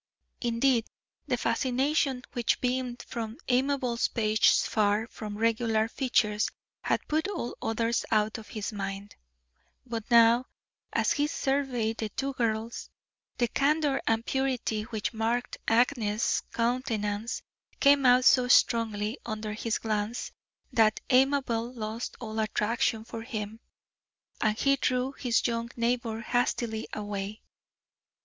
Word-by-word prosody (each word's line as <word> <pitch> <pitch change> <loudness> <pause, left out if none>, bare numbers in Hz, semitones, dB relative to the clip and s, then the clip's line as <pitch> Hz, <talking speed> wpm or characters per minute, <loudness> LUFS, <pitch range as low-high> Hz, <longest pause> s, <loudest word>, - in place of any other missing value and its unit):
Indeed, 235 0 +2 0.4
the - - +1
fascination 265 0 0
which 240 -3 +1
beamed 250 -1 -2
from 225 0 -5
Amabel 255 -2 +1 0.2
Page's 215 0 +3
far 210 0 +1
from 210 -3 -7
regular 225 0 +1
features 220 -4 +1 0.3
had - - -1
put 315 +4 0
all 350 -12 -4
others 230 +1 0
out 215 0 +1
of 215 - -12
his 215 0 -5
mind, 200 0 -5 0.7
but 230 -2 -5
now, 235 +1 +6 0.4
as - - +1
he 290 0 +2
surveyed 265 -6 -1
the 220 - -3
two 275 +5 -3
girls, 230 -1 -2 0.5
the 240 - +2
candour 285 +3 +1
and 225 +1 +1
purity 260 -5 -1
which 220 0 -3
marked 230 +2 -1
Agnes's 230 -2 +2
countenance 230 -3 -1 0.4
came 280 0 +5
out 250 0 +5
so 250 -1 +6
strongly 225 -1 +3
under 215 -1 -4
his 225 +1 -1
glance 215 +1 -2 0.4
that 220 -2 +4
Amabel 255 -3 +2
lost 220 +1 -5
all 220 -2 -5
attraction 220 +2 0
for 230 0 -7
him, 220 -2 -5 0.8
and 215 -1 +2
he 275 +2 +3
drew 255 0 0
his 245 -4 0
young 230 0 -1
neighbour 235 -1 -1
hastily 235 -2 -1
away. 205 0 -5
230 Hz, 125 wpm, -28 LUFS, 220-250 Hz, 0.8 s, now